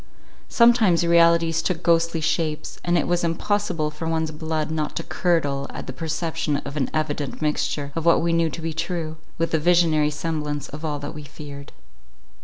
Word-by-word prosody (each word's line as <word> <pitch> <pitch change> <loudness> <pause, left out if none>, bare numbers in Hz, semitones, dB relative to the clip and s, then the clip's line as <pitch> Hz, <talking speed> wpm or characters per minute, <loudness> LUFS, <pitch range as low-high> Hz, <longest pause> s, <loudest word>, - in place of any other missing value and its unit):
Sometimes 230 -8 +4
realities 170 -1 +4
took 175 0 -2
ghostly 165 -1 +2
shapes; 155 -1 -1
and 175 0 +2
it 160 - 0
was 175 0 +1
impossible 170 -2 0
for 150 +2 -5
one's 160 -1 0
blood 155 0 -3
not 155 -1 -2
to - - -2
curdle 145 -6 0
at - - -7
the 130 - -6
perception 160 0 -2
of 145 - -7
an 140 -4 0
evident 150 -2 -2
mixture 150 -1 -1
of 165 - -2
what 170 0 +5
we 165 0 +1
knew 165 -1 +2
to 165 - -7
be 165 -1 -2
true, 165 -1 -3 0.2
with 165 0 -1
the 160 - +2
visionary 160 -2 +3
semblance 150 -1 -3
of 150 +3 -8
all 150 -2 -2
that 145 +1 -6
we 150 -2 -8
feared. 140 -1 -10
160 Hz, 185 wpm, -23 LUFS, 150-170 Hz, 0.2 s, what